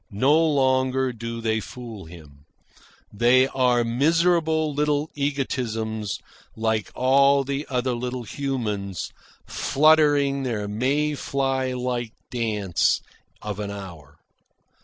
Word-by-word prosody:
No 130 +9 +3
longer 130 -3 +2
do 115 0 -6
they 110 -1 0
fool 115 -3 -9
him. 75 -4 -14 0.7
They 120 +5 +4
are 125 -2 +2
miserable 160 +4 +2
little 150 +1 0
egotisms, 115 -7 -2 0.4
like 110 -2 -1
all 140 +2 +4
the 140 +2 -3
other 125 -1 0
little 125 +1 -4
humans, 105 - -3 0.3
fluttering 145 -2 +3
their 115 -6 -2
May 135 +8 0
fly 135 -2 -1
life 125 -2 -2 0.2
dance 105 -8 0 0.4
of 105 -1 -4
an 105 -1 -3
hour. 90 -9 -9
125 Hz, 105 wpm, -24 LUFS, 110-140 Hz, 0.7 s, They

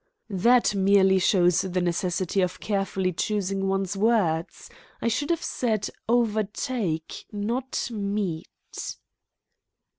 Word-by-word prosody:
"That 235 +5 +4
merely 195 -1 +4
shows 180 -2 +3
the 185 -1 -2
necessity 180 +2 0
of 180 0 -1
carefully 195 -3 -1
choosing 195 +1 -1
one's 195 0 -1
words. 195 -7 +1 0.3
I - - -1
should 285 +7 0
have 335 -1 0
said 220 -5 -1 0.2
'overtake,' 220 -6 -1
not 235 +5 -2
'meet.'" 200 -6 -4
195 Hz, 100 wpm, -26 LUFS, 185-220 Hz, 0.3 s, That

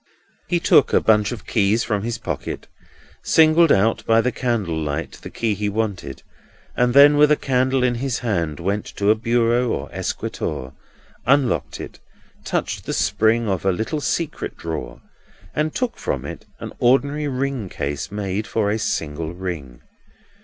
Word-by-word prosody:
He 175 - +1
took 145 - +4
a - - +6
bunch 105 -2 +3
of 115 -6 -7
keys 110 +2 +2
from 105 -3 -1
his 115 +2 -3
pocket, 80 - -5 0.6
singled 160 0 +5
out 105 +4 +3
by 115 0 +5
the 125 +2 +1
candle 115 -10 -1
light 75 -2 -3
the - - -8
key 115 -2 -1
he 105 +1 -2
wanted, 100 - -3 0.5
and 125 0 +2
then, 145 +1 +8
with 150 0 +5
a - - +6
candle 130 -1 +1
in 125 -1 +2
his 125 +1 -2
hand, 85 -9 -1
went 100 +4 -1
to 100 +1 +3
a - - +4
bureau 120 +2 +1
or 75 - -3
escritoire, 65 0 -4 0.5
unlocked 135 -2 +2
it, - - -8 0.4
touched - - -2
the - - -3
spring 110 +1 +2
of 95 -3 -1
a 95 - +3
little 110 - -2
secret 160 +1 -2
drawer, 65 -7 -6 0.5
and 155 0 -1
took 250 -2 -2
from 70 -1 -3
it - - -8
an - - -7
ordinary 140 +4 +2
ring 130 -6 -2
case 70 0 -4
made 105 0 -3
for 105 -2 0
a 110 - -1
single 80 -4 -3
ring. 85 -9 -6
110 Hz, 165 wpm, -21 LUFS, 90-130 Hz, 0.6 s, then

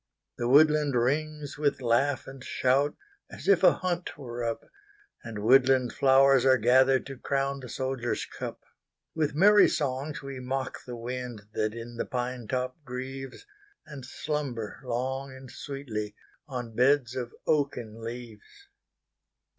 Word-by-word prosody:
The 120 - 0
woodland 150 +1 +5
rings 145 +4 -1
with 145 -2 +1
laugh 130 +3 +1
and 135 -1 -10
shout, 135 +3 +1 0.3
As - - -10
if 200 -3 +5
a - - +8
hunt 175 -3 -3
were 120 -4 -6
up, 115 -1 -2 0.6
And 110 -3 -6
woodland 130 +1 +4
flowers 135 -1 +5
are 130 -1 +5
gatheredTo 130 +2 +3
crown 140 0 -1
the 125 -2 -9
soldier's 130 -2 -2
cup. - - -7 0.5
With 150 -3 -1
merry 205 +5 +7
songs 140 +1 -2
we 135 -1 -6
mock 130 +1 -4
the 125 -1 -6
windThat 115 -3 -4
in 115 0 -8
the - - -1
pine 125 -2 -3
top 130 +4 -3
grieves, 135 - -7 0.4
And 150 -4 -9
slumber 130 -4 -4
long 130 +2 -3
and 130 -1 -11
sweetlyOn 120 -1 -7
beds 130 0 +3
of 125 -2 -4
oaken 125 -7 -1
leaves. 120 - -9
130 Hz, 130 wpm, -28 LUFS, 120-140 Hz, 0.6 s, a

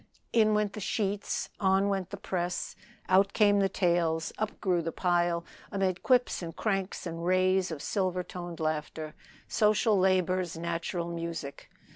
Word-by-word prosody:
In 215 -2 +4
went 210 -1 +1
the - - -6
sheets, 205 0 -2
on 195 0 +3
went 195 -2 -1
the 200 - -6
press, 180 -2 -3 0.3
out 195 +2 +4
came 205 -2 +4
the 195 -1 +3
tales, 170 -3 +1
up 215 0 -3
grew 180 -3 +1
the 165 0 -3
pile, 175 -1 +1 0.3
amid 190 -3 0
quips 250 -5 +2
and 165 -2 -6
cranks 195 -4 -2
and 165 -1 -5
rays 185 +1 +3
of 155 -4 -6
silver 185 -3 0
toned 175 -1 -7
laughter, 155 0 -3 0.3
social 215 0 +3
labor's 185 -2 +1
natural 170 +1 -3
music. 165 -4 -5
185 Hz, 150 wpm, -29 LUFS, 170-195 Hz, 0.3 s, In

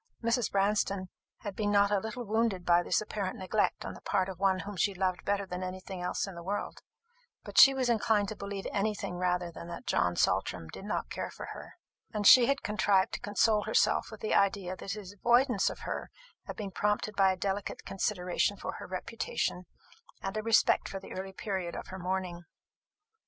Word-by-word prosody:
Mrs. 230 0 +1
Branston 195 -1 +1 0.3
had 205 -3 -5
been 210 -2 0
not 200 0 +4
a 205 - +3
little 220 +4 -5
wounded 215 -4 0
by 175 0 +5
this - - +1
apparent 205 -3 -3
neglect 195 +3 0
on - - -5
the - - -12
part 195 -2 0
of 185 -2 -7
one 190 -1 +2
whom 205 0 -7
she 200 +2 +1
loved 185 -1 -1
better 200 0 0
than 180 -1 -5
anything 185 0 -6
else 180 - -1
in 195 - -8
the 170 - -8
world; 195 +4 -4 0.6
but - - +1
she 270 0 +9
was 260 -2 0
inclined 220 -3 +2
to 215 - -5
believe 200 -1 -6
any 210 +1 0
thing 180 -3 -5
rather 180 -1 0
than 170 - -9
that 170 - -8
John 90 0 +1
Saltram 80 - 0
did 190 - -9
not 210 - -3
care - - -3
for - - -8
her; - - -11 0.4
and 210 -2 -2
she 240 +3 +9
had 275 0 0
contrived 205 -3 +2
to - - -2
console 210 +1 +2
herself - - +2
with - - -11
the 440 - -1
idea 195 -2 +2
that 195 +1 -5
his 200 -2 -8
avoidance 240 +5 +3
of - - -8
her - - -4 0.4
had - - -6
been 200 -3 -5
prompted 210 +2 0
by 195 -1 +5
a 185 - -3
delicate 195 +1 -3
consideration 195 0 0
for - - -4
her - - -8
reputation, 185 -1 -3 0.6
and 195 +1 -3
a 215 - -1
respect 225 0 +3
for 195 - -5
the 190 - -12
early 190 +1 -5
period 190 -3 -4
of - - -7
her 190 - -7
mourning. 180 -1 -3
195 Hz, 205 wpm, -30 LUFS, 185-210 Hz, 0.6 s, she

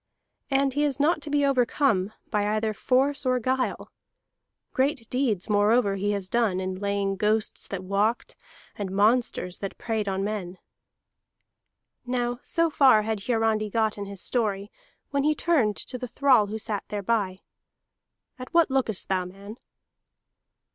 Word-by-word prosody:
And 275 0 +2
he 290 +2 +1
is 285 -2 0
not 305 +2 +2
to 295 - -7
be 290 -1 +2
overcome 250 -6 +2 0.2
by 205 -2 +1
either 215 0 -1
force 270 +6 +1
or 255 -1 +1
guile; 255 +2 -2 0.8
great 265 -4 0
deeds, 240 -8 0
moreover, 205 0 +3
he 200 +1 -1
has 200 -2 -3
done 220 -4 +1
in 185 0 -4
laying 200 -1 -1
ghosts 215 +2 0
that 190 -2 -5
walked, 200 +5 0 0.4
and 200 -2 -4
monsters 205 -2 +1
that 195 - -5
preyed 220 -3 -2
on 195 0 -1
men." 195 -3 -4 1.5
Now 245 -1 -2
so 335 -1 +1
far 260 -8 +5
had 215 -2 -3
Hiarandi 225 -3 +1
got 220 0 0
in 205 - -5
his 200 -2 -8
story, 210 -4 -1 0.4
when 280 0 +1
he 305 +2 +2
turned 270 -14 +1
to 250 - -4
the 250 - -4
thrall 255 -4 +3
who 215 +2 -4
sat 210 -2 -3
thereby. 200 -2 -1 1.0
"At 255 - -8
what 335 -5 +4
lookest 245 -7 0
thou, 185 -1 0
man?" 200 +4 -10
220 Hz, 150 wpm, -26 LUFS, 200-255 Hz, 1.5 s, far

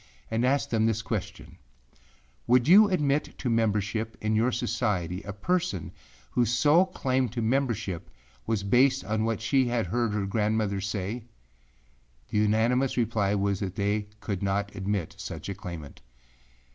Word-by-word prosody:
and 115 +2 +1
asked 140 +3 +1
them 110 -1 +2
this 115 0 0
question, 110 -3 -5 0.9
Would 125 +1 +4
you 205 +5 +8
admit 150 -5 0
to 125 - -2
membership 110 0 0
in 110 0 0
your 115 +4 +2
society 95 -7 -1
a 105 - -6
person 135 - -1 0.4
whose 120 -2 +2
sole 150 +10 +4
claim 130 -7 0
to 120 +2 -4
membership 115 -7 -1 0.4
was 110 -3 0
based 130 +6 +3
on 110 +1 0
what 115 -1 -1
she 130 +3 +2
had 120 -3 0
heard 115 +4 0
her 105 -2 -1
grandmother 105 -1 0
say? 100 +4 -3 1.1
The 105 - +1
unanimous 115 +6 +2
reply 105 -4 +1
was 100 -1 0
that 95 -2 -4
they 105 +1 0
could 100 -4 -3
not 100 +1 -1
admit 100 0 -2
such 95 -3 -6
a - - -2
claimant. 85 -7 -8
110 Hz, 150 wpm, -27 LUFS, 100-125 Hz, 1.1 s, you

